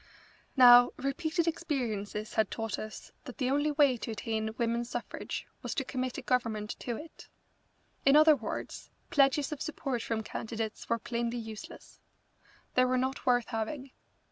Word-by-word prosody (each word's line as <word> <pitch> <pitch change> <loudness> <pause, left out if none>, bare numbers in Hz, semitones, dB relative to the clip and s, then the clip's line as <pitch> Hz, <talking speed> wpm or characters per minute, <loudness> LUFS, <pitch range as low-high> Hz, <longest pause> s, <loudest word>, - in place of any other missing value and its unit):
Now 245 -1 +9
repeated 315 +5 -1
experiences 230 -11 -2
had 220 -3 +2
taught 225 -3 -3
us 215 0 -8
that 255 - -9
the 255 -2 0
only 290 +2 +2
way 285 -4 +4
to 230 - -6
attain 220 0 -2
women's 235 0 0
suffrage 240 - -5 0.2
was - - -4
to 270 - 0
commit 255 -1 -3
a - - -6
Government 225 -4 0
to 240 - -3
it. 320 +1 -11 0.8
In 275 +1 +6
other 310 0 +8
words, 225 -6 -6 0.2
pledges 275 +1 +3
of 300 - -5
support 275 -6 -3
from 225 -1 -2
candidates 220 0 -5
were 230 - +2
plainly 235 +1 -2
useless. 220 -2 -9 0.7
They 255 - +4
were 255 0 +1
not 260 +2 -2
worth 245 -2 +3
having. 250 +4 -4
245 Hz, 155 wpm, -31 LUFS, 225-275 Hz, 0.8 s, Now